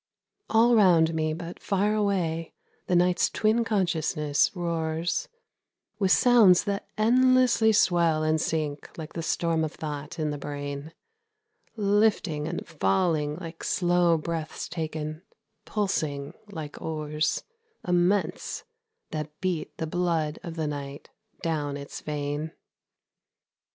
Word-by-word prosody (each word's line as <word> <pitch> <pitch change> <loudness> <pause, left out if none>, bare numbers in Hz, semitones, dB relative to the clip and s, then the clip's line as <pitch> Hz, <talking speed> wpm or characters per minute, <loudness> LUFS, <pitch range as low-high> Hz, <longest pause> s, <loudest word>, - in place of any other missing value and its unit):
All 230 +2 +5
round 175 -7 +5
me, 155 -1 0
but 165 +2 -6
far 205 +2 +1
away, 180 -6 0 0.3
the 180 - +2
night's 180 0 +3
twin 220 +2 +2
consciousness 160 -8 +1
roars 170 - -1 0.7
With 195 -2 +2
sounds 225 -8 +6
that 200 -1 -3
endlessly 250 0 +4
swell 170 -6 +3
and 155 0 +2
sink 150 -3 -2
like 160 -1 -7
the 165 - -3
storm 165 0 0
of 155 - -3
thought 150 0 -6
in 155 -2 -1
the 145 - -4
brain, 145 +1 -5 0.8
Lifting 205 -7 +1
and - - -4
falling 150 - +1
like 165 -1 -8
slow 175 -2 +3
breaths 160 0 -4
taken, 155 -1 -4 0.4
pulsing 155 -9 -2 0.2
like 160 -6 -7
oars 155 -1 -1 0.4
Immense 180 0 +1 0.5
that 150 -1 -5
beat 180 -4 -3
the 160 - -2
blood 160 -2 -1
of 165 -1 -7
the 160 -2 -2
night 140 -1 -6 0.3
down 150 -4 -1
its 140 0 -8
vein. 150 +1 -3
165 Hz, 120 wpm, -27 LUFS, 155-185 Hz, 0.8 s, sounds